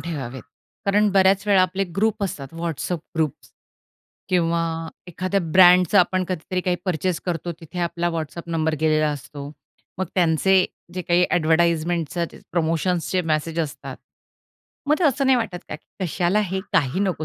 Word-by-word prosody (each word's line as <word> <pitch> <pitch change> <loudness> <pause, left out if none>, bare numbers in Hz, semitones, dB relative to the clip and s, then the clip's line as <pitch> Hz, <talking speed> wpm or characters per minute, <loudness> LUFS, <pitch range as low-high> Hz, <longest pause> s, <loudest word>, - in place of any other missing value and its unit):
ठेवावेत, 135 -7 -5 0.4
कारण 205 +1 +3
बऱ्याच 195 +1 +4
वेळा 195 -2 +5
आपले 185 +2 0
ग्रुप 220 +1 +1
असतात, 150 -5 -6
WhatsApp 170 +1 -2 0.2
ग्रुप 155 -3 +1 1.0
किंवा 170 -2 +1 0.4
एखाद्या 185 +3 -1
ब्रँडचं 180 +2 +6
आपण 185 0 +2
कधीतरी 185 +1 -2
काही 180 -1 0
पर्चेस 180 -1 -1
करतो, 175 0 -2
तिथे 165 +2 -9
आपला 175 0 -1
WhatsApp 165 +2 -6
नंबर 160 -1 0
गेलेला 155 -1 +2
असतो. 145 0 -7 0.5
मग 190 - -1
त्यांचे 180 +2 +3 0.3
जे 185 - -3
काही 175 +1 +3
एडव्हर्टाइजमेंट 170 0 +2
जे 170 -1 -3
प्रमोशन्सचे 170 +2 0
मेसेज 160 +2 -1
असतात. 155 -3 -5 0.9
मग 300 - +5
ते 365 - +1
असं 275 -2 +2
नाही 265 -1 +5
वाटत 215 -7 -2
का, - - -5
की 185 +4 -9
कशाला 180 +4 +1
हे? 190 -2 -2
काही 150 +4 +1
नको, 185 -6 -1
175 Hz, 150 wpm, -23 LUFS, 160-190 Hz, 1.0 s, ब्रँडचं